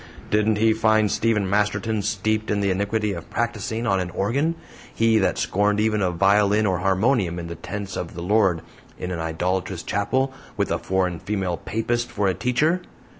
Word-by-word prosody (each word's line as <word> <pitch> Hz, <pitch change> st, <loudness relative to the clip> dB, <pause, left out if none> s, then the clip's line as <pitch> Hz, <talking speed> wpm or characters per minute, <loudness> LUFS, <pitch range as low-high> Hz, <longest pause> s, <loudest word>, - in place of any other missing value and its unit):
Didn't 105 Hz, +1 st, +3 dB
he 110 Hz, +1 st, +4 dB
find 110 Hz, -2 st, +3 dB
Stephen 105 Hz, -3 st, +1 dB
Masterton 105 Hz, +2 st, 0 dB
steeped 110 Hz, +2 st, -1 dB
in 105 Hz, -, +1 dB
the 100 Hz, -1 st, +1 dB
iniquity 100 Hz, +2 st, 0 dB
of 85 Hz, -2 st, -8 dB
practicing 115 Hz, -1 st, -2 dB
on 95 Hz, -4 st, +2 dB
an 90 Hz, -1 st, -2 dB
organ 135 Hz, -, 0 dB, 0.4 s
he 115 Hz, -1 st, +3 dB
that 95 Hz, -, +1 dB
scorned 105 Hz, +1 st, +1 dB
even 110 Hz, -1 st, +1 dB
a 95 Hz, -, +2 dB
violin 100 Hz, +4 st, +3 dB
or 95 Hz, -3 st, +1 dB
harmonium 95 Hz, 0 st, +1 dB
in 85 Hz, -, -5 dB
the 85 Hz, 0 st, -6 dB
tents 95 Hz, +3 st, -6 dB
of 85 Hz, -, -5 dB
the 85 Hz, -, -5 dB
Lord 95 Hz, -3 st, +2 dB, 0.3 s
in 90 Hz, -, -5 dB
an 85 Hz, -, -3 dB
idolatrous 85 Hz, +3 st, -2 dB
chapel, 130 Hz, +6 st, 0 dB, 0.2 s
with -, -, 0 dB
a -, -, 0 dB
foreign 90 Hz, -2 st, -1 dB
female 95 Hz, -3 st, -2 dB
Papist 120 Hz, +6 st, -2 dB
for 105 Hz, -1 st, 0 dB
a 95 Hz, -, +2 dB
teacher? 135 Hz, -, +1 dB
105 Hz, 180 wpm, -23 LUFS, 95-110 Hz, 0.4 s, he